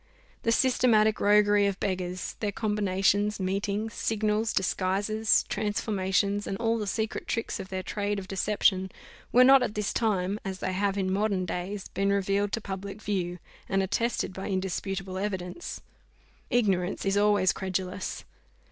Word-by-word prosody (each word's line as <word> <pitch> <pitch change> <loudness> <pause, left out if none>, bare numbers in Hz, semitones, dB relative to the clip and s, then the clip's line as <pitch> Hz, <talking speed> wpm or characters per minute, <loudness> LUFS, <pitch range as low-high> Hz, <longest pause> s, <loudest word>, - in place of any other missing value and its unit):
The 230 - +1
systematic 230 -4 +3
roguery 205 0 +4
of 195 -1 -2
beggars, 185 -2 -3
their 210 -2 -1
combinations, 205 0 +1
meetings, 200 +3 -2
signals, 215 0 0
disguises, 200 +4 +1
transformations, 205 -1 0
and 195 - -3
all 230 0 0
the 210 - -3
secret 220 +2 -2
tricks 230 - -2
of 190 - -7
their 185 0 -3
trade 205 +1 -2
of 190 -1 -6
deception, 190 -1 +1 0.4
were 250 - +7
not 270 +1 +7
at 220 -4 -2
this 210 -1 -1
time, 205 -3 0
as 190 -3 -4
they 185 - -3
have 200 +1 0
in 190 -1 0
modern 200 -2 0
days, 185 +3 -4
been 195 0 0
revealed 200 +1 +1
to - - 0
public 195 +1 -6
view, 180 -4 -2 0.3
and 195 0 +2
attested 215 +1 -1
by 190 - -5
indisputable 190 0 -3
evidence. 190 - -4 0.7
Ignorance 195 -7 +1
is 195 0 +1
always 205 -2 +3
credulous. 185 0 -4
200 Hz, 145 wpm, -28 LUFS, 190-210 Hz, 0.7 s, were